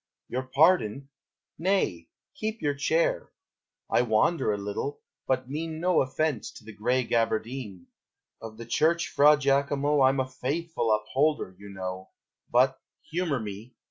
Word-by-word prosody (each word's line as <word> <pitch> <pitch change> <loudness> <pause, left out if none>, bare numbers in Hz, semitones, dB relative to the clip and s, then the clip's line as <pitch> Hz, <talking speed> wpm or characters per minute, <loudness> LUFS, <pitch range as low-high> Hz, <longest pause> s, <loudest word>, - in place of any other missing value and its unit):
Your 130 - -2
pardon! 140 - +3 0.5
nay, 165 - 0 0.2
keep 220 -6 -4
your 145 -1 0
chair! 160 +4 0 0.6
I - - +3
wander 125 +4 +2
a 105 - -1
little, 100 +8 -4 0.3
but 130 -1 0
mean 155 +3 -4
No 180 +1 +3
offence 135 -1 -1
to - - -13
the 110 0 -10
gray 125 +4 0
gaberdine; 115 -4 -2 0.6
Of 110 -1 -9
the 115 - -8
church, 165 +8 +1
Fra 150 +1 +6
Giacomo, 140 +1 +2
I'm 135 +1 +4
a 130 - 0
faithful 135 0 -2
upholder, 120 0 0
you 100 0 -11
know, 95 -1 -6 0.4
But 130 +2 +3 0.3
(humor 165 -5 0
me!) 110 +3 -8
130 Hz, 140 wpm, -27 LUFS, 110-155 Hz, 0.6 s, Fra